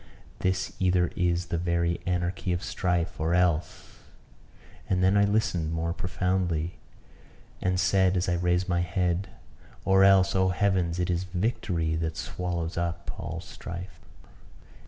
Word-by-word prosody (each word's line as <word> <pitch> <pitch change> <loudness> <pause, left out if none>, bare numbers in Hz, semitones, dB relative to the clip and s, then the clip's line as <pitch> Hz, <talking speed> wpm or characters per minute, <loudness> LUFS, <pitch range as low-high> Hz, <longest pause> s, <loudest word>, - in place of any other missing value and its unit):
this 95 0 -1
either 90 -2 +2
is 90 0 0
the 85 - +1
very 85 0 0
anarchy 90 0 -1
of 90 +2 -1
strife, 90 -3 -1
or 80 +2 +1
else" 90 -3 0 0.9
and 90 -1 +2
then 95 +2 +4
I 100 0 +5
listened 100 -6 0
more 85 +1 -1
profoundly, 90 -2 -1 0.8
and 90 0 +1
said 95 0 +3
as 90 - 0
I 90 - +1
raised 90 +1 +1
my 85 -1 +1
head 90 +1 0 0.6
"or 95 0 +5
else, 95 -1 +5
oh 95 0 +3
heavens! 90 -1 +1
it 90 0 0
is 90 +1 -1
victory 90 -4 -1
that 80 0 -2
swallows 85 -2 -3
up 85 -1 -3
all - - -5
strife." 90 +2 -8
90 Hz, 140 wpm, -27 LUFS, 85-95 Hz, 0.9 s, I